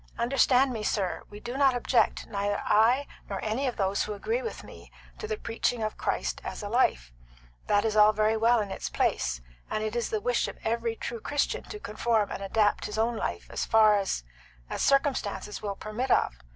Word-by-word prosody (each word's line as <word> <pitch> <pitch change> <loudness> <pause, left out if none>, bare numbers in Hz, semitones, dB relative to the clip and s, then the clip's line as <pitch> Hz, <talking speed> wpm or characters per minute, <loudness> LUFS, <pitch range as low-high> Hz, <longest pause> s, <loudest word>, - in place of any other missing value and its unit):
Understand 255 +1 +3
me, 220 - -4
sir, 200 -3 -1
we 205 - -10
do 240 +3 -6
not 270 -2 +4
object, 245 0 +1
neither 205 -1 -2
I 235 +6 +4 0.2
nor - - -3
any 225 +6 -1
of 250 - -3
those 195 -1 +1
who 210 - -2
agree 455 - -1
with 455 - -6
me, - - -13 0.3
to 435 - -5
the 435 0 -2
preaching 230 - -1
of 215 - -2
Christ - - -2
as - - -6
a 205 - -4
life. 60 - +1 0.5
That 205 +1 +3
is 220 -1 0
all 210 0 +7
very 215 +1 +2
well 230 +2 +4
in 200 -2 -5
its - - -4
place, 60 -2 0 0.3
and 215 - -2
it 215 +1 -3
is 235 -1 -1
the 215 - -1
wish 245 +3 0
of - - -7
every 230 0 -1
true 235 +1 -5
Christian 290 0 -1
to 420 - -8
conform 220 - 0
and - - -5
adapt 205 +1 +1
his 210 - -6
own 230 +2 +1
life - - -3
as - - -2
far 215 -1 +5
as 195 - -1 0.5
as - - -2
circumstances 275 -7 +1
will 205 -2 -3
permit 215 +6 -4
of. - - +3
220 Hz, 205 wpm, -28 LUFS, 210-245 Hz, 0.5 s, all